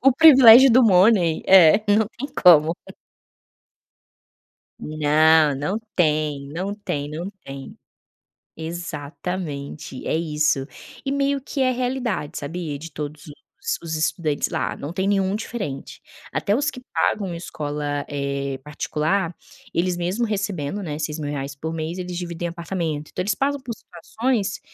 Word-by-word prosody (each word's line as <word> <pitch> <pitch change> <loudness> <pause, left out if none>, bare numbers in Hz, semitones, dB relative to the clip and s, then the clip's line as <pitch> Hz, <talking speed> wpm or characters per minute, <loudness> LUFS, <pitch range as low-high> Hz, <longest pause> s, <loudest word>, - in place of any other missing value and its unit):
O 270 0 +6
privilégio 265 -4 +9
do 255 +2 +6
money. 185 -5 +4
É, 190 0 +7
não 210 +1 +4
tem 280 +3 -4
como. 165 -2 +7 2.0
Não, 155 0 +3
não 165 +10 -2 0.2
tem, 150 -4 0
não 185 +7 -4
tem, 145 -9 -4
não 165 +6 -5
tem. 135 0 -9 0.8
Exatamente, 160 -3 -6
é - - 0
isso. 150 -4 0 0.4
E 270 - -2
meio 280 0 0
que 275 +1 -5
é 255 -1 +3
realidade, 245 - -2
sabia. 150 0 -5
De 165 +3 -9
todos 150 0 -7
os 145 - -10 0.5
os 160 -1 -3
estudantes 155 -1 0
lá, - - -2
não 145 - -6
tem 190 +3 -1
nenhum 195 -1 +1
diferente. 210 - -5 0.3
Até 200 - 0
os 285 +6 +1
que 250 - -10
pagam 205 -2 +1
uma 175 -2 -5
escola, 145 -3 -4
eh, 140 -1 -3
particular, 155 +4 -1 0.4
eles, 175 +1 0
mesmo 180 +7 -1
recebendo, 200 -4 -3
né, 150 -1 -5
R$6.000 145 -3 -4
por 160 +3 -5
mês, 160 +3 -4
eles 180 -1 -5
dividem 175 -1 -4
apartamento. 170 -3 -4
Então, 180 - -3
eles 200 0 0
passam 280 +3 -1
por 240 -3 -6
situações 215 +4 -3
170 Hz, 140 wpm, -22 LUFS, 150-205 Hz, 2.0 s, privilégio